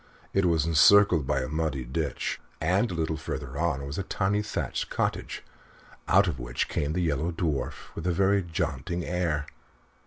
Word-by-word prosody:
It 95 -1 +3
was 80 -3 +2
encircled 85 0 +6
by - - +1
a 65 - -3
muddy 75 -3 -1
ditch, 70 +5 -3 0.2
and 95 +8 +2
a 90 - -4
little 80 -1 -1
further 65 -3 -5
on 75 -5 0
was 70 +4 -4
a - - -1
tiny 100 +2 0
thatched 105 - -3
cottage, - - -2 0.6
out - - +5
of 65 - -2
which - - -2
came 75 +1 -1
the 90 +1 0
Yellow 80 +1 0
Dwarf 80 -6 -3
with - - -5
a - - +3
very 100 +3 +3
jaunty 85 -1 -3
air. 85 -5 -1
80 Hz, 175 wpm, -27 LUFS, 70-90 Hz, 0.6 s, encircled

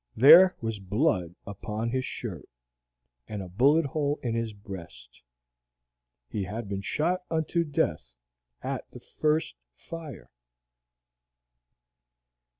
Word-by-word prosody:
There 180 +9 +9
was 115 -2 -3
blood 95 - 0
upon 105 +3 -4
his 130 0 -1
shirt, 95 - -6 0.8
and 105 -2 -5
a - - -8
bullet 140 - +4
hole 145 +1 -1
in 120 -3 -1
his 115 -1 -1
breast. 85 - -11 1.1
He 100 - -3
had 105 +3 -5
been 100 0 -3
shot 170 - 0
unto 165 +1 0
death 60 - -1 0.5
at - - -4
the - - -11
first 155 - -1 0.2
fire. 160 - -9
115 Hz, 110 wpm, -28 LUFS, 95-150 Hz, 1.1 s, There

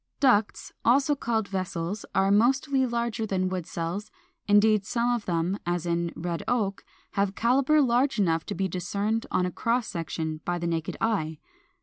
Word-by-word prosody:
] - - -46
413. 255 -7 +7
=Ducts=, - - -12
also 275 +5 +4
called 225 -5 -1
VESSELS, 185 0 -3
are 195 +1 +3
mostly 265 +5 +3
larger 235 -2 -2
than 185 -2 0
wood 180 -2 -4
cells: 175 +6 -4 0.4
indeed, 210 0 +5
some 240 +3 0
of 235 -3 -2
them, 175 +3 -1
as 175 0 -2
in 170 0 0
Red 170 0 -3
Oak, 205 -5 0 0.3
have 200 -1 0
calibre 275 +5 +3
large 255 +2 +2
enough 165 -5 +2
to - - -3
be 190 +2 0
discerned 200 +5 -2
on 180 - +1
a 180 - -2
cross 235 +5 0
section 160 -4 -4
by 175 0 -1
the 170 - -4
naked 165 -1 -2
eye. 160 -9 0
200 Hz, 180 wpm, -27 LUFS, 175-235 Hz, 0.4 s, 413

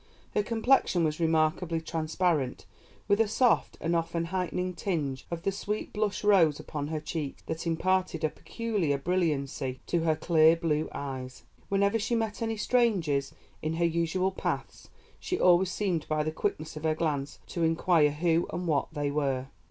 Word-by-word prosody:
Her 210 - +3
complexion 225 -4 +2
was 155 0 0
remarkably 165 +1 +1
transparent, 160 -3 -1 0.4
with 205 +1 +4
a 225 - +3
soft 245 +3 +2
and 170 +1 0
often 165 0 -1
heightening 180 0 -1
tinge 150 -9 -3
of 170 -1 -5
the 195 - +1
sweet 210 +2 -4
blush 210 -1 -1
rose 175 -8 +4
upon 145 -1 -4
her 155 0 -2
cheeks 150 -2 -5
that 160 +1 -4
imparted 180 0 0
a 155 - +3
peculiar 205 -8 -2
brilliancy 140 -5 -1
to 175 - 0
her 160 -1 +2
clear 160 0 +5
blue 155 -2 -1
eyes. 130 -2 -6 0.3
Whenever 200 +3 +2
she 225 +3 0
met 225 0 -2
any 225 -1 -1
strangers 190 - +1 0.3
in 155 +1 -1
her 170 +1 +1
usual 170 +3 +1
paths - - -4 0.3
she 365 - -2
always 180 +1 +5
seemed 185 -6 -1
by 155 0 0
the 155 - -2
quickness 155 0 -3
of 155 - -6
her 160 -1 +2
glance 145 -4 -2
to 170 - -2
inquire 165 -1 +3
who 165 +3 +1
and 180 +2 -3
what 150 -4 +1
they 145 -2 -1
were." 135 -3 -1
165 Hz, 165 wpm, -29 LUFS, 155-185 Hz, 0.4 s, clear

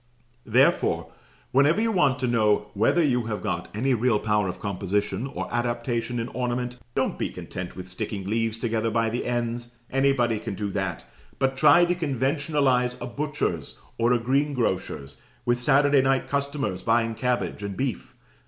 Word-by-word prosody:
Therefore, - - +2 0.4
whenever 145 +8 +4
you 225 0 +1
want 145 -10 +3
to 130 - +1
know 105 -3 +2
whether 115 +11 +3
you 125 -5 +1
have 105 -2 -3
got - - -3
any 130 +5 +1
real 120 -1 +2
power 105 -2 +1
of 90 - -5
composition 100 +5 -2
or - - -5
adaptation 120 0 -1
in 115 0 -2
ornament, 125 0 -3 0.2
don't - - 0
be - - -1
content 90 0 -7
with 95 -1 -7
sticking 95 +2 -4
leaves 115 +2 0
together 115 -1 -1
by 115 -1 +1
the 120 - -2
ends, 120 0 -2 0.2
anybody 135 -4 +2
can 100 - -5
do 100 0 -3
that; 95 -4 -3 0.3
but 135 0 +1
try 175 +6 +6
to 175 - +1
conventionalize 135 -4 0
a - - -4
butcher's 130 - -3 0.2
or 115 +1 +3
a 125 - +4
greengrocer's, 125 - -1 0.3
with 120 0 +2
Saturday 140 +1 +4
night 135 0 +1
customers 140 -9 -2
buying 115 0 +2
cabbage 125 -2 -1
and 100 -1 -5
beef. 130 -1 -3
120 Hz, 160 wpm, -25 LUFS, 110-135 Hz, 0.4 s, try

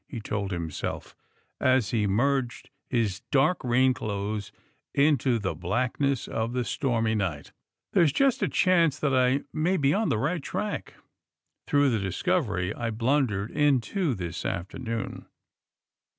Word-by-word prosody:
he 120 - -6
told 100 -2 -3
himself, 85 -4 -4 0.4
as 130 -6 +2
he 110 -3 +1
merged 120 +4 0 0.2
his 110 -6 0
dark 155 +5 +2
rain 130 +1 +3
clothes 105 -2 -4 0.4
into 140 -4 +3
the 95 -5 -2
blackness 125 - -1
of 115 +2 -2
the 125 -1 -1
stormy 115 -5 0
night. 90 -9 -2
*^ - - -18 0.4
There's 165 -5 +4
just 270 - +2
a - - +2
chance 170 -5 +3
that 145 -3 0
I 130 +2 +3
may 170 +4 +1
be 140 -2 +2
on 215 +2 +1
the - - +1
right 150 +8 -1
track 210 +8 -4 0.7
through 145 -2 +3
the 115 - +1
discovery 100 - 0
I 115 -1 -3
blundered 115 -3 0
into 145 - +1
this 85 -4 -5
afternoon." 110 +6 -4
120 Hz, 140 wpm, -27 LUFS, 105-145 Hz, 0.7 s, There's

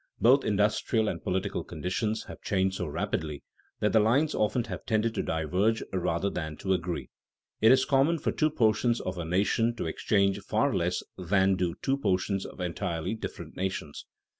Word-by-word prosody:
Both 130 +4 +5
industrial 105 +2 +1
and 85 -5 -3
political 95 +2 -1
conditions 105 +4 -2
have - - -11
changed 95 -1 0
so 90 - -3
rapidly 75 0 -3 0.4
that 105 - +2
the 110 - +6
lines 130 +9 +3
often 110 +3 +1
have - - -6
tended 110 0 +1
to - - -1
diverge 90 +8 0
rather 90 +1 0
than 80 -3 -4
to 95 - 0
agree. 85 -7 -3 0.5
It 110 - +7
is 130 0 +5
common 145 +4 +3
for - - -1
two 155 - +2
portions 115 -2 +2
of 90 -1 -4
a 85 - -3
nation 105 +7 +1
to 120 - -4
exchange 100 +4 +1
far - - 0
less - - 0 0.2
than 95 +1 +3
do 90 -2 -1
two 135 +1 +1
portions 95 -3 0
of - - -13
entirely 85 +1 -2
different 110 - -7
nations. 95 -6 -4
100 Hz, 175 wpm, -28 LUFS, 90-110 Hz, 0.5 s, It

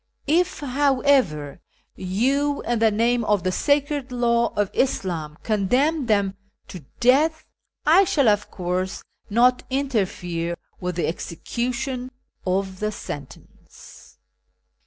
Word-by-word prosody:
If, 345 +4 +1
however, 260 - +1 0.4
you, 270 +10 0
in 235 0 0
the 225 0 +5
name 235 +3 +1
of 210 -3 +1
the 185 - +1
sacred 285 +3 0
hiw 235 -1 +1
of 205 -2 +1
IsLhn, 170 - -1
condenni 250 +8 +1
theiu 200 -3 +2 0.4
to 180 - -7 0.2
death, 295 +6 +3 0.4
I 335 +6 +6
shall, 335 -8 +2
\:)i 210 -1 +2
course, 185 0 -3 0.3
not 245 +4 +4
interfere 185 -10 -2 0.2
with 180 -1 -3
the 175 - 0
execution 245 - -3 0.4
of 190 0 -1
the 215 0 -1
sentence. 145 -8 -11
235 Hz, 115 wpm, -23 LUFS, 185-270 Hz, 0.4 s, I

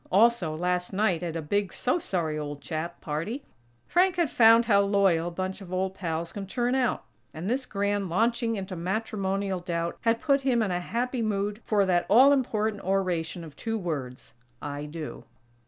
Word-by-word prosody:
Also, 200 -5 +4
last 180 +2 -1
night, 190 -4 +1
at 170 -2 -4
a 165 - -3
big 200 +4 0
"so 255 +8 0
sorry, 170 - -2
old 145 -1 -5
chap" 165 +3 -5
party, 170 - -3 0.4
Frank 365 +1 +3
had 340 -6 +1
found 230 0 +6
how 200 -3 +5
loyal 195 -4 +2
a - - -1
bunch 185 +3 -4
of 185 -2 -10
old 185 +1 -1
pals 165 -3 -3
can 200 -2 -6
turn 245 +4 0
out; 260 -3 +1 0.3
and 160 +4 -5
this 250 +3 -1
"grand 200 -1 -1
launching 230 +5 +1
into 190 -2 -5
matrimonial 195 +1 -2
doubt" 170 -1 -3
had 230 0 +2
put 280 -1 +2
him 250 -4 +2
in 200 - -1
a 180 0 -1
happy 245 +6 -2
mood 210 0 -1
for 205 -2 +3
that 175 -2 +1
all 260 +7 +7
important 220 -6 0
oration 180 -3 -1
of 155 -3 -11
two 225 +5 -3
words: 135 - -5 0.3
"I 145 0 -5
do." 155 0 -7
195 Hz, 185 wpm, -27 LUFS, 170-225 Hz, 0.4 s, all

